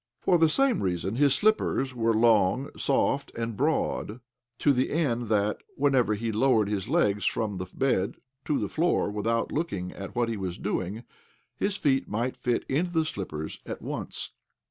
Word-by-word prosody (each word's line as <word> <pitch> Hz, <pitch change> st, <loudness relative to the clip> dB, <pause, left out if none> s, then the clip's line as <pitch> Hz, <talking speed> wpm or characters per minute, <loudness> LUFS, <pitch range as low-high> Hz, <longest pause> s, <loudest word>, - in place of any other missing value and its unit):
For 175 Hz, -, +3 dB
the 160 Hz, -1 st, +5 dB
same 270 Hz, -, +2 dB
reason 95 Hz, +2 st, -1 dB
his 140 Hz, -1 st, +4 dB
slippers 205 Hz, -11 st, +1 dB
were 115 Hz, -2 st, +1 dB
long, 115 Hz, +2 st, +3 dB
soft, 140 Hz, 0 st, +1 dB
and 115 Hz, -1 st, -3 dB
broad, 130 Hz, -4 st, -1 dB, 0.4 s
to 145 Hz, -, +3 dB
the 130 Hz, 0 st, +1 dB
end 120 Hz, -7 st, 0 dB
that, 105 Hz, -1 st, +1 dB
whenever 135 Hz, -6 st, +2 dB
he 115 Hz, +2 st, -2 dB
lowered 110 Hz, -1 st, +3 dB
his 100 Hz, -3 st, -2 dB
legs 105 Hz, 0 st, +2 dB
from 105 Hz, -4 st, -1 dB
the 90 Hz, -, -4 dB
bed 125 Hz, -8 st, 0 dB, 0.3 s
to 150 Hz, -, +1 dB
the -, -, -1 dB
floor 165 Hz, -9 st, +1 dB
without 115 Hz, +3 st, -1 dB
looking 100 Hz, -, -2 dB
at 95 Hz, -1 st, -8 dB
what 120 Hz, -1 st, +1 dB
he 115 Hz, -1 st, -2 dB
was 95 Hz, -2 st, -4 dB
doing, 100 Hz, +2 st, -3 dB, 0.5 s
his 200 Hz, 0 st, -1 dB
feet 135 Hz, -3 st, +1 dB
might 120 Hz, +4 st, -1 dB
fit 120 Hz, -1 st, -1 dB
into 165 Hz, +6 st, 0 dB
the 160 Hz, -1 st, +2 dB
slippers 80 Hz, -, -5 dB
at -, -, -6 dB
once. -, -, -5 dB
115 Hz, 170 wpm, -27 LUFS, 105-140 Hz, 0.5 s, the